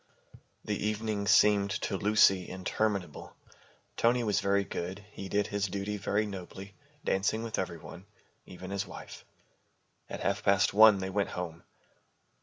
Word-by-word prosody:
The 105 - -2
evening 105 -1 -2
seemed 105 -1 +5
to - - -2
Lucy 95 -2 +3
interminable. 95 -2 -3 0.6
Tony 120 +1 +2
was 105 -3 +1
very 100 0 +1
good. 95 +1 -6
He 95 -1 -8
did 105 +2 +1
his 100 0 -1
duty 100 +2 -3
very 100 +2 0
nobly, 95 0 -8 0.3
dancing 100 +4 0
with 115 -1 -3
every 90 -2 -3
one, - - -12 0.4
even 95 +1 -9
his 100 -1 -2
wife. - - -10 0.9
At - - -6
half 100 +1 0
past 100 0 +3
one 110 0 +8
they 95 0 -4
went 100 +1 0
home. 85 -1 -6
100 Hz, 145 wpm, -30 LUFS, 95-105 Hz, 0.9 s, one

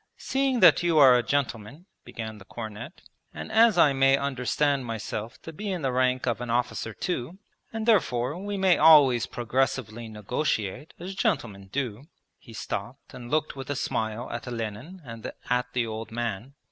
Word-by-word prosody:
'Seeing 265 -3 0
that 180 - +7
you 170 -2 +2
are 135 -4 +8
a 120 - +3
gentleman,' 135 - -3 0.2
began 110 -2 -7
the 95 - -14
cornet, 110 -1 -8 0.3
'and - - -7
as 225 -2 +5
I 150 -4 +5
may 135 0 +4
understand 140 +1 0
myself 115 0 -5
to 165 - -8
be 205 +5 -4
in 180 -5 -3
the 135 - +1
rank 130 0 +1
of 120 -1 -1
an 125 - -5
officer 120 -1 -1
too, 165 - -4 0.3
and 225 -1 -4
therefore 140 - +2
we 205 0 -3
may 190 -2 +3
always 145 -7 +6
progressively 120 -2 -2
negotiate, 110 +3 -3
as 180 +3 -7
gentlemen 135 - -2
do.' 130 -2 -3 0.3
(He 115 - -15
stopped 105 +3 -6
and 120 -1 -9
looked 155 +1 0
with 135 -1 -8
a 145 - -1
smile 110 -1 -2
at 120 +2 -6
Olenin 120 - -6
and 115 -2 -7 0.2
at 125 0 0
the 125 -2 +1
old 110 0 -6
man.) 120 +2 -4
125 Hz, 170 wpm, -26 LUFS, 115-155 Hz, 0.3 s, are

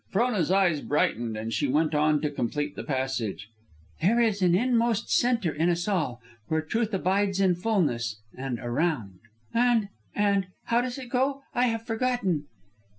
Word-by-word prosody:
'" - - -38
Frona's 210 -5 +1
eyes 185 -6 +3
brightened, 120 -6 0
and 110 +1 -4
she 110 +7 +1
went 155 +4 +1
on 150 0 +3
to 150 - -1
complete 145 +2 -2
the - - -5
passage: 130 -7 -3 0.5
"'There 215 +8 +3
is 220 -4 +2
an 175 -1 +4
inmost 235 0 +1
centre 235 -8 +2
in 160 +4 +1
us 175 +1 0
all, 155 - 0 0.3
Where 160 0 0
truth 220 +7 -1
abides 195 0 +1
in 190 -2 +4
fulness; 150 - 0 0.2
and 130 -2 -3
around.' 120 - -1 0.3
"And 235 -3 +3 0.3
and 200 -2 +2 0.2
how 235 +1 +2
does 250 +1 -4
it 255 -2 -8
go? 270 +2 0
I 250 +1 +3
have 225 -1 -2
forgotten." 225 - 0
180 Hz, 165 wpm, -27 LUFS, 145-225 Hz, 0.5 s, an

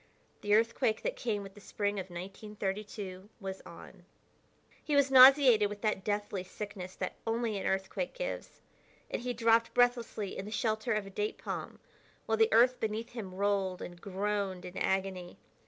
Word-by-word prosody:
The 205 0 +3
earthquake 225 0 +1
that - - -1
came 210 -4 -2
with 195 -1 -10
the 205 - -14
spring 205 0 -2
of 190 0 -6
1932 195 +1 -6
was 190 -2 -6
on. 175 +2 -13 0.8
He 295 - 0
was 280 -1 +4
nauseated 255 -5 +8
with 205 0 -8
that 210 -4 0
deathly 205 -2 -2
sickness 190 -1 -7
that 185 - -4
only 225 -1 0
an - - -2
earthquake 190 - -2
gives, - - -5 0.5
and - - -2
he 250 0 -2
dropped 230 0 +3
breathlessly 240 -5 +1
in 195 - -5
the 210 - -7
shelter 220 +1 0
of 210 -1 -1
a 195 - -10
date 210 +2 -2
palm - - -5 0.5
while 220 0 0
the 225 0 +5
earth 245 +3 +5
beneath 220 +2 -3
him 200 -6 -7
rolled 195 -2 0
and 175 -1 -9
groaned 200 -1 -2
in 180 - -9
agony. 190 -2 -1
210 Hz, 170 wpm, -31 LUFS, 190-225 Hz, 0.8 s, nauseated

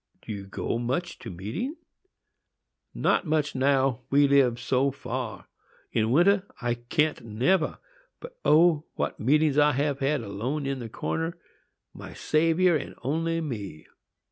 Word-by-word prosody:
"Do - - -7
you 100 -1 -7
go 110 +3 -3
much 150 +9 -2
to - - -8
meeting?" 110 - -4 1.2
"Not - - +1
much 150 -1 +1
now, 135 -2 +2
we 140 +1 +5
live 135 -4 +3
so 130 +2 +1
far. 125 -6 -5 0.4
In 110 0 +1
winter 180 - +4 0.2
I 120 -1 0
can't 130 +4 -1
never. 130 - +1 0.4
But, - - -10
O! 160 -1 +4
what - - -2
meetings 150 +4 +3
I 150 0 +5
have 140 +1 0
had, 140 0 +1
alone 115 +8 -3
in 135 -1 -2
the 115 -2 -6
corner,—my 165 +8 -7
Saviour 165 +3 +2
and 150 - -4
only 165 +5 0
me!" 105 - -6
140 Hz, 140 wpm, -27 LUFS, 120-160 Hz, 1.2 s, we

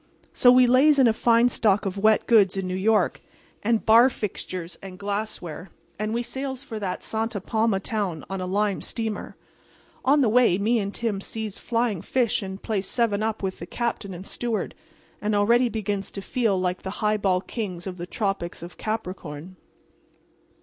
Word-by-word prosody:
"So 245 - +6
we 250 0 +7
lays 270 +5 +5
in 265 - +6
a 225 - +4
fine 235 +1 +4
stock 210 -3 +2
of 195 -1 -2
wet 215 +1 +4
goods 200 -5 +4
in 190 - -2
New 185 - -3
York, 210 +3 +2 0.4
and 225 +1 +1
bar 230 +4 +7
fixtures 185 -6 -5
and 190 -1 -9
glassware, 200 -4 -4 0.3
and 215 0 -1
we 235 +2 -1
sails 265 +1 -4
for 225 -6 -6
that 190 -3 -4
Santa 225 -1 -2
Palma 220 0 +1
town 195 -6 -3
on 195 -1 -4
a 185 - -3
lime 200 +1 0
steamer. 220 -3 -4 0.7
On 285 +2 +4
the 255 - +4
way 230 -5 +4
me 225 +4 +2
and 200 -1 -2
Tim 210 -3 -2
sees 220 -1 -5
flying 230 -6 -1
fish 235 +2 0
and 190 0 -7
plays 200 -4 -1
seven 225 -4 +1
up 220 -1 -2
with 190 -1 -3
the 170 - -7
captain 230 -2 -3
and 180 +2 -9
steward, 235 0 -3 0.5
and 210 0 0
already 235 +4 +4
begins 205 -2 -2
to 195 - -5
feel 225 -5 +1
like 180 0 -1
the 190 - -5 0.2
high 210 0 +3
ball 190 -3 +2
kings 185 -3 -5
of 185 -2 -6
the 175 0 -6
tropics 195 -5 -3
of 175 - -10
Capricorn. 185 -6 -5
210 Hz, 185 wpm, -25 LUFS, 190-230 Hz, 0.7 s, we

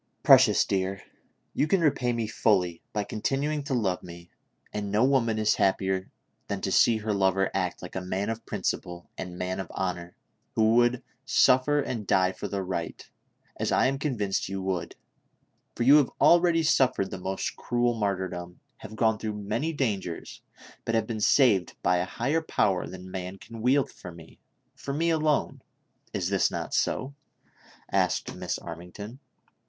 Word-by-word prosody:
"Precious - - +6
dear, 95 0 -2 0.5
you 150 - +1
can 190 +4 +3
repay 140 -6 +1
me 115 -1 -1
fully 95 -6 +1
by 105 -1 -1
continuing 140 +8 -1
to 140 -2 -2
love 95 -7 0
me, 85 0 -12 0.4
and 105 -1 -3
no 105 +3 +3
woman 125 -5 +2
is 110 -1 +3
happier 95 -1 0 0.4
than - - -3
to - - -2
see 115 -2 +5
her 110 0 -2
lover 95 -1 +2
act 90 -2 -2
like 90 - -9
a 95 - -2
man 95 +2 -2
of 115 0 -4
principle 85 0 -4
and 90 -1 -7
man 90 +1 -3
of 95 - -4
honor, 90 -2 -4 0.4
who 110 0 +4
would 120 +1 +3 0.2
suffer 135 +1 +4
and 115 -7 -3
die 95 0 +3
for - - -6
the 100 -1 -3
right, 90 -3 -5 0.5
as - - -1
I - - +3
am 135 +1 0
convinced 105 -12 -1
you 95 0 -3
would, 95 -3 -3 0.8
for 120 - -1
you 140 +5 +8
have 145 -4 +3
already 170 -1 +5
suffered 130 -10 +2
the - - -5
most 95 +1 -3
cruel 120 0 0
martyrdom; 95 -5 -3 0.2
have 110 - -10
gone 110 -1 +2
through 110 -1 -3
many 115 +11 -1
dangers, 100 - -3 0.4
but 115 - -1
have 110 -1 +1
been 110 -1 -4
saved 105 - +3
by 90 - +3
a 90 - 0
higher 135 - -1
power 100 - 0
than 90 0 -9
rnan 95 +1 -6
can 115 0 -10
wield 130 +3 +2
for 90 - -10
me; 80 -1 -15 0.4
for 140 - -5
me 165 +2 +1
alone! 155 -2 0 0.5
Is - - -2
this - - +3
not - - -5
so 135 +2 0 0.3
V - - -36 0.2
" - - -27
asked - - 0
Miss - - -3
Armington. 90 +8 -9
105 Hz, 175 wpm, -27 LUFS, 95-130 Hz, 0.8 s, you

